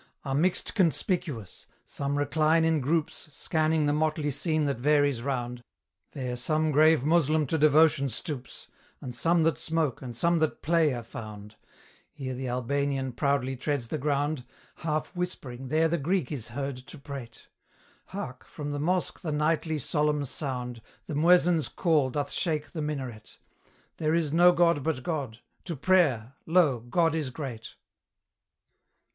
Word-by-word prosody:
Are 135 - -2
mixed 170 +6 +1
conspicuous: 165 - -1 0.2
some 140 +3 -3
recline 155 +3 +2
in 160 -1 +2
groups, 155 +3 -1
Scanning 155 +1 +1
the 145 - +2
motley 155 -1 0
scene 155 +2 0
that 140 -4 -1
varies 145 -2 +3
round; 125 -2 -3 0.5
There 125 -3 -3
some 155 +5 0
grave 155 -1 +5
Moslem 155 -1 +3
to 160 +4 -1
devotion 150 -2 +5
stoops, 130 - -6 0.3
And 125 -2 -7
some 165 +5 +2
that 160 -1 +1
smoke, 160 -5 -1
and 120 -3 -7
some 170 +5 +2
that 155 -1 -1
play 165 -1 +3
are 120 - -5
found; 105 -2 -9 0.6
Here 130 -2 -5
the 130 +1 -4
Albanian 135 +2 -1
proudly 135 0 0
treads 130 -2 -2
the 155 - -2
ground; 145 0 0 0.3
Half 155 +2 -3
whispering 135 -8 -5
there 160 +4 +3
the 170 +1 0
Greek 170 0 0
is 130 -7 -4
heard 135 +2 -4
to 130 +5 -12
prate; 135 -4 -9 0.6
Hark! 130 -10 -6
from 145 -1 -6
the 145 - -3
mosque 180 +4 0
the 165 -4 -3
nightly 155 +1 0
solemn 150 +1 +1
sound, 125 -4 -4 0.2
The - - -6
muezzin's 170 +1 +4
call 155 -7 +2
doth 145 +2 -2
shake 155 -4 -1
the 160 - -4
minaret, 130 -7 -5 0.6
'There 155 0 +1
is 160 -3 0
no 175 +2 +7
god 170 -4 +3
but 140 -3 -2
God! 135 -9 -3 0.2
to 170 - -4
prayer 140 -7 +2
lo! 160 -7 +4
God 160 +8 +1
is 155 -4 -1
great!' 130 -5 -7
145 Hz, 150 wpm, -28 LUFS, 130-160 Hz, 0.6 s, no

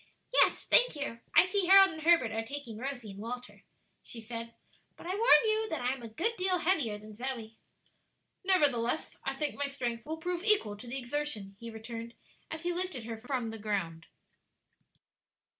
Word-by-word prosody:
"Yes, - - +4
thank - - +4
you; 285 -6 -4 0.2
I - - +8
see 375 -1 0
Harold 390 0 +8
and 315 0 -7
Herbert 325 -8 +4
are 225 0 -1
taking 230 -2 -7
Rosie 245 -4 -5
and 195 - -11
Walter," 245 +3 -7 0.4
she 235 - -8
said. 230 +1 -7 0.4
"But - - -12
I - - -5
warn 450 +5 +6
you 435 0 +1
that 320 - -3
I 250 +1 +1
am 265 - -9
a 230 - -7
good 360 - -1
deal 370 0 +2
heavier 320 - +1
than 215 +1 -12
Zoe." 230 -1 -4 0.8
"Nevertheless, 295 -8 +2
I 270 - -2
think 295 +1 -1
my 285 - -1
strength 245 -4 -3
will 315 +2 -5
prove 350 +2 -3
equal 405 - +3
to 210 +4 -11
the 245 +3 -4
exertion," 245 -7 -4
he 230 - -7
returned, 230 +1 -7 0.3
as 320 +1 -6
he 350 0 0
lifted 360 -8 -2
her 225 0 -6
from 245 -1 -3
the 225 - -8
ground. 175 -6 -3
255 Hz, 185 wpm, -31 LUFS, 225-340 Hz, 0.8 s, I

